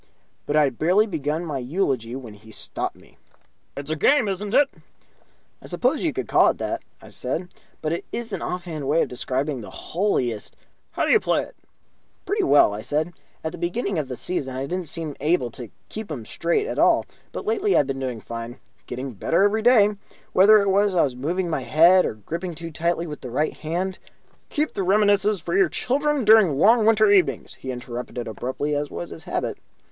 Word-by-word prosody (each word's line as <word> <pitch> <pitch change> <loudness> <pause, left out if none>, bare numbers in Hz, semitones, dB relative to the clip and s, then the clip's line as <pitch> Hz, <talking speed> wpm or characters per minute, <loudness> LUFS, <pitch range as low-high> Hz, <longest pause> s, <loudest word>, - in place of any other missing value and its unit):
But 145 - 0
I 155 - +6
had 135 -5 -1
barely 185 +7 +4
begun 160 -3 -2
my 145 -4 -3
eulogy 130 - -1
when 125 -5 -8
he 105 +2 -16
stopped 110 - -2
me. - - -21 0.6
"It's 140 +2 -5
a - - +1
game, 255 - +3
is 195 -1 -2
it?" 250 +8 +3 0.9
"I - - -11
suppose - - 0
you - - +1
could - - -4
call - - +5
it - - -2
that," - - -3 0.2
I - - -12
said, 165 +8 -4 0.3
"but 155 - 0
it 170 - -4
is 230 -3 -4
an 190 - -3
offhand 170 -6 -4
way 155 +4 +3
of - - -5
describing 130 +2 -2
the 105 - -9
holiest 130 - -2 0.2
" - - -45
"How - - 0
do - - +2
you 440 - +6
play - - +1
it?" - - -13 0.7
"Pretty 415 +1 0
well," 145 - +5
I 105 - -5
said. 150 +8 -2 0.3
"At 160 - -2
the 175 - -9
beginning 180 +1 -1
of 145 - -3
the 125 -2 -6
season 135 -8 -3
I 130 +1 -2
didn't 180 +3 -4
seem 155 -2 -4
able 150 -5 +1
to 120 -2 -9 0.2
keep 220 -5 -7
'em 120 -7 -5
straight 170 - 0
at - - -3
all, - - +4 0.3
but - - -6
lately 425 -2 +2
I've - - +4
been 135 0 -3
doing 125 -4 -4
fine. 115 +3 -7 0.3
Getting 130 +2 -5
better 165 - +1
every 210 +2 +2
day. 215 -3 +5 0.4
Whether 205 +3 +7
it 200 -2 +2
was 200 0 +3
that 180 - +2
I - - +5
was 130 -3 -1
moving 170 +8 -2
my 155 -5 -1
head 170 +9 +5
or - - -5
gripping 170 - -5
too 165 +1 -7
tightly 170 +2 -1
with 150 -3 -7
the 125 - -6
right 150 +6 0
hand 180 +4 -3 0.3
" - - -36
"Keep 300 0 -1
the - - -2
reminiscences 205 0 +3
for 170 - -4
your 195 -2 +5
grandchildren 285 - 0
during 215 -2 +7
the 155 - -1
long 220 - +5
winter 215 -2 +5
evenings," 175 - +2
he 130 - -6
interrupted, 125 -1 -5
abruptly, 130 +7 -3
as 145 0 -1
was 85 0 -6
his 85 - -10
habit. - - -3
165 Hz, 215 wpm, -23 LUFS, 130-200 Hz, 0.9 s, Whether